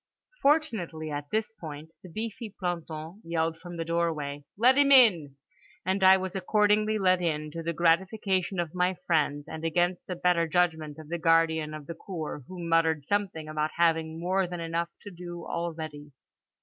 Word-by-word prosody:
Fortunately 220 Hz, -, +1 dB
at 145 Hz, 0 st, -5 dB
this 220 Hz, 0 st, -1 dB
point 160 Hz, -6 st, -9 dB
the 185 Hz, -, -12 dB
beefy 220 Hz, +4 st, -5 dB
planton 170 Hz, 0 st, -4 dB
yelled 165 Hz, -1 st, -1 dB
from 175 Hz, -1 st, -9 dB
the 165 Hz, -, -3 dB
doorway 155 Hz, -4 st, -2 dB
"Let 250 Hz, +5 st, +5 dB
him 280 Hz, 0 st, +4 dB
in," 180 Hz, -, +6 dB, 0.5 s
and 190 Hz, +1 st, 0 dB
I 190 Hz, 0 st, +8 dB
was 190 Hz, 0 st, -5 dB
accordingly 210 Hz, +2 st, +2 dB
let 185 Hz, -2 st, +3 dB
in, 155 Hz, -3 st, -1 dB
to 165 Hz, -, -5 dB
the 165 Hz, +1 st, -2 dB
gratification 185 Hz, +3 st, +1 dB
of 170 Hz, -3 st, -2 dB
my 180 Hz, +1 st, +1 dB
friends, 145 Hz, -3 st, +1 dB
and 160 Hz, -, -7 dB
against 175 Hz, +2 st, 0 dB
the 180 Hz, -, -3 dB
better 175 Hz, -1 st, +2 dB
judgment 160 Hz, -3 st, 0 dB
of 155 Hz, -1 st, -11 dB
the 170 Hz, 0 st, -2 dB
guardian 160 Hz, -2 st, +2 dB
of 150 Hz, -2 st, -9 dB
the 170 Hz, -, -6 dB
cour, 160 Hz, -5 st, -6 dB
who 180 Hz, -2 st, -7 dB
muttered 160 Hz, -3 st, +2 dB
something 195 Hz, -6 st, -1 dB
about 155 Hz, 0 st, -2 dB
having 160 Hz, -1 st, +1 dB
more 185 Hz, +2 st, +1 dB
than 175 Hz, 0 st, -6 dB
enough 165 Hz, +1 st, -2 dB
to 205 Hz, -, -8 dB
do 175 Hz, -1 st, -8 dB
already. 155 Hz, -3 st, -5 dB
170 Hz, 175 wpm, -28 LUFS, 160-185 Hz, 0.5 s, I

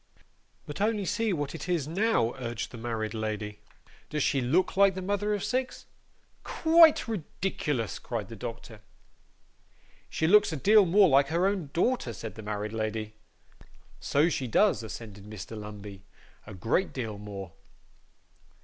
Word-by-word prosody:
'But 145 Hz, +6 st, -6 dB
only 210 Hz, -1 st, +1 dB
see 225 Hz, +3 st, 0 dB
what 145 Hz, -5 st, -2 dB
it 165 Hz, +2 st, -7 dB
is 165 Hz, -6 st, 0 dB
now,' 180 Hz, -, +1 dB
urged 120 Hz, -3 st, -4 dB
the 120 Hz, -, -9 dB
married 110 Hz, -2 st, -3 dB
lady. 105 Hz, -1 st, -4 dB, 0.5 s
'Does 150 Hz, -2 st, -1 dB
SHE 135 Hz, -, +1 dB
look 160 Hz, +12 st, +1 dB
like 195 Hz, -1 st, +5 dB
the -, -, -3 dB
mother 205 Hz, +2 st, 0 dB
of 205 Hz, -, -4 dB
six?' 255 Hz, +4 st, -2 dB, 0.6 s
'Quite 325 Hz, -3 st, +5 dB
ridiculous,' 185 Hz, -, -3 dB
cried 115 Hz, -5 st, -4 dB
the 115 Hz, -, -9 dB
doctor. 115 Hz, 0 st, -8 dB, 1.3 s
'She 160 Hz, -, -1 dB
looks 210 Hz, +4 st, +5 dB
a -, -, -2 dB
deal 205 Hz, +5 st, +5 dB
more 195 Hz, +3 st, +6 dB
like 140 Hz, -2 st, +4 dB
her 170 Hz, +4 st, +1 dB
own 195 Hz, -7 st, -1 dB
daughter,' 175 Hz, -, 0 dB
said 110 Hz, -1 st, -7 dB
the 110 Hz, -, -9 dB
married 105 Hz, 0 st, -4 dB
lady. 110 Hz, -1 st, -3 dB, 0.9 s
'So 145 Hz, +3 st, +2 dB
she 135 Hz, -6 st, -2 dB
does,' 200 Hz, -, +3 dB
assented 105 Hz, -2 st, -9 dB
Mr. 110 Hz, +1 st, -8 dB
Lumbey. 105 Hz, -2 st, -9 dB, 0.5 s
'A 105 Hz, -, -8 dB
great 115 Hz, -, 0 dB
deal 110 Hz, -6 st, -4 dB
more. 100 Hz, -3 st, -7 dB
135 Hz, 150 wpm, -28 LUFS, -, 1.3 s, more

